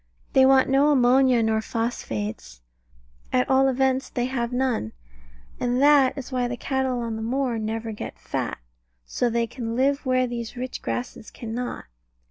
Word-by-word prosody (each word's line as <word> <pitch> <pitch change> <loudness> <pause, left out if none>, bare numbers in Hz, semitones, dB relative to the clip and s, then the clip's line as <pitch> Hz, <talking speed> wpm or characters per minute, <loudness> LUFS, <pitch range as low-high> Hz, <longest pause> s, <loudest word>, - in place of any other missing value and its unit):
They 265 0 +6
want 265 -1 +5
no 275 +2 +4
ammonia 255 -2 +4
nor 220 0 +1
phosphates 105 - -4 0.7
at 125 - +2
all 265 0 +4
events 265 0 +1
they 245 -2 -1
have 245 -2 -2
none, 245 - -1 0.7
and 245 0 0
that 280 -1 +5
is 275 0 -7
why 250 -1 0
the 245 0 -4
cattle 260 -1 -1
on 230 -1 -3
the - - -5
moor 245 0 -1
never 225 +1 -3
get 210 - -7
fat. - - -4 0.5
So 245 - 0
they 235 0 +1
can 230 -1 -5
live 275 +3 +1
where 255 -1 +2
these 240 -1 -5
rich 255 +1 -5
grasses 245 -3 -5
cannot. 240 +2 -5
245 Hz, 160 wpm, -24 LUFS, 230-265 Hz, 0.7 s, They